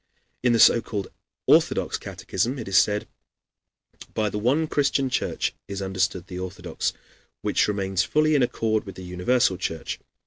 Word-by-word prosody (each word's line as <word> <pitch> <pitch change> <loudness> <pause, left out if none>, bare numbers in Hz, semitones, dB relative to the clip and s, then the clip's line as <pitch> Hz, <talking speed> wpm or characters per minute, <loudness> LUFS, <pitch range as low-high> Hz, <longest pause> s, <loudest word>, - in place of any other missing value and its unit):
In 125 -1 +3
the 115 - +3
so 115 - +7
called 100 -4 -4 0.4
Orthodox - - +3
catechism 120 +9 -2
it 115 - -6
is 95 - -2
said: 105 0 +1 1.1
By 105 -2 0
the 105 - -2
one 135 +9 +2
Christian 140 -3 +1
Church - - -1
is 100 0 -5
understood 95 -2 -1
the 90 -1 -7
Orthodox, 95 +3 -3 0.5
which - - +2
remains 95 -2 0
fully 155 +8 +2
in 145 - +4
accord 110 -3 0
with 95 - -8
the 95 - -9
Universal 90 +4 +1
Church. 80 -3 -4
105 Hz, 160 wpm, -25 LUFS, 95-125 Hz, 1.1 s, so